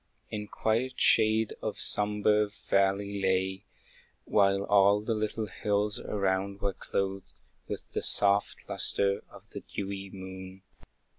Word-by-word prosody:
In 105 -1 -4
quiet 115 +5 -1
shade 110 0 +4
the - - -2
sombre 105 0 +2
valley 100 0 0
lay, 95 0 0 0.6
While 100 -1 +3
all 100 0 +4
the 115 +2 -1
little 110 0 -2
hills 105 +3 -1
around 100 0 -1
were 100 -1 -1
clothed 95 0 -3 0.3
With - - -6
the - - -2
soft 100 0 +2
lustre 100 0 +1
of - - -16
the - - -6
dewy 100 -1 -6
moon. 95 0 -9
100 Hz, 125 wpm, -29 LUFS, 95-105 Hz, 0.6 s, shade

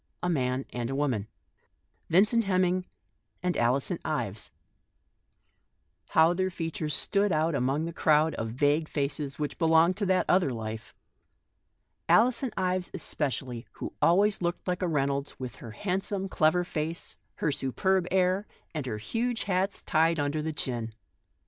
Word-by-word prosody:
A 180 - +1
man 130 -4 0
and 120 -1 -3
a 135 - -2
woman 130 -8 0 0.4
— - - -45
Vincent 210 +6 +4
Hemming 185 -1 +1 0.6
and 180 -1 0
Alison 135 +8 +1
Ives. 115 -9 -3 1.6
How 160 +2 +5
their 185 +1 0
fea 165 -2 -4
tures 150 -1 -3
stood 200 +4 +2
out 160 +1 +2
among 140 +3 0
the 170 - -5
crowd 155 0 +3
of 115 - -3
vague 145 +6 +1
faces, 145 -1 -2
which 150 -1 -4
belonged 165 +2 +4
to 205 -2 -1
that 185 0 +3
other 180 -5 +3
life. 110 -2 -6 1.1
Alison 250 +3 +4
Ives 185 -1 0
especially, 135 -8 -3
with - - -4
her - - +5
handsome, 200 +3 +3
clever - - -3
face, - - -34
looking - - -40
like 180 -1 -1
a 180 - +1
Reynolds, 140 -3 -1
with 130 -1 -6 1.8
her 150 - 0
superb 180 +8 0
air, 190 +2 +2 0.3
and 150 -5 -3
her 110 -3 -3
huge 230 - -2
hat 195 0 -1
tied 165 -1 +3
under 145 +2 0
the 160 +1 -2
chin. 120 -6 -2
160 Hz, 150 wpm, -28 LUFS, 135-185 Hz, 1.8 s, How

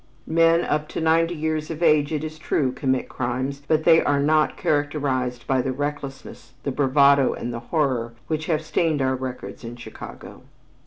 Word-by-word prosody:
Men 165 +1 +3
up 150 0 -1
to - - -5
ninety 165 +1 +2
years 155 0 -2
of 165 +1 -4
age, 150 -2 +4
it 155 -1 -2
is 155 0 -6
true, 135 -4 0
commit 130 0 -1
crimes, 130 +3 -3
but 155 0 +2
they 165 -1 +6
are 145 -1 +2
not 155 +2 +2
characterized 140 -4 -1
by 130 -1 +2
the 130 +1 -2
recklessness, 140 -1 -6
the 140 - -1
bravado 140 0 +4
and 120 +1 -5
the 115 - -4
horror 130 -7 0
which 155 0 -3
have 160 -2 0
stained 155 -2 +1
our 130 0 +1
records 125 -6 -6
in 115 +1 -7
Chicago. 120 - -10
145 Hz, 175 wpm, -23 LUFS, 130-155 Hz, -, they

